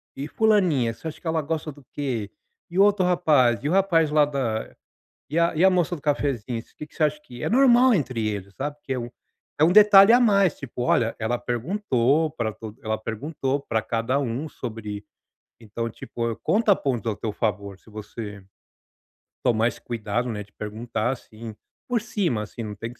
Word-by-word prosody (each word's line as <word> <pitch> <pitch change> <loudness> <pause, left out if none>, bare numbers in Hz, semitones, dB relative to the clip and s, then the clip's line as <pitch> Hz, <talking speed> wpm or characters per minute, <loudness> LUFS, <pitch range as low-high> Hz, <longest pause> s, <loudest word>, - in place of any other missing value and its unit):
e 140 +2 -5
fulaninha, 180 - +2
você 140 - -9
acha 155 - -7
que - - -27
ela 160 0 +1
gosta 155 +1 -3
do 145 0 -17
quê, 125 -8 -3 0.4
e 175 - -6
outro 200 -1 +4
rapaz, 150 - +3
e 145 - 0
o - - 0
rapaz 175 -5 +3
lá 150 -1 +5
da 130 -6 -3 0.5
e 155 - -2
a 170 0 +3
e 160 - +2
a 190 - +8
moça 180 -1 +1
do 150 - -11
cafezinho, 135 -5 -1
o - - -26
que 150 - -8
que - - -24
você - - 0
acha 150 0 0
que", 120 -4 -10
é - - 0
normal 255 0 +5
entre 125 - -1
eles, 100 -2 -5
sabe, 145 +2 -4
porque 140 -2 -5
é 130 - -2
um, 120 0 -5 0.5
é - - +5
um 165 - +5
detalhe 205 0 +8
a 245 - +7
mais, 200 -8 +3
tipo, 125 -2 -6
"Olha, 115 -2 +2
ela 115 +2 0
perguntou 140 - 0
pra 120 -8 -2
to 110 0 -9
ela 110 0 -1
perguntou 135 +5 -3
pra 110 -5 -1
cada 115 +5 -1
um 135 +3 -3
sobre", 105 -5 -7 0.6
então, 115 +1 -4
tipo, 115 +1 -4
conta 210 -1 +3
pontos 125 - -2
ao 105 - -1
teu 110 -1 -4
favor, 100 -3 -3
se - - -23
você 105 -1 -8 1.0
tomar 115 -1 +3
esse - - -11
cuidado, 120 +1 -3
né, 105 -3 -4
de 105 - -23
perguntar 110 +2 -3
assim, 115 -3 -9 0.3
por 245 -3 0
cima, 190 - -1
assim, 110 - -8
não 105 -1 -6
tem 115 +3 -6
que 120 - -26
130 Hz, 200 wpm, -24 LUFS, 115-165 Hz, 1.0 s, a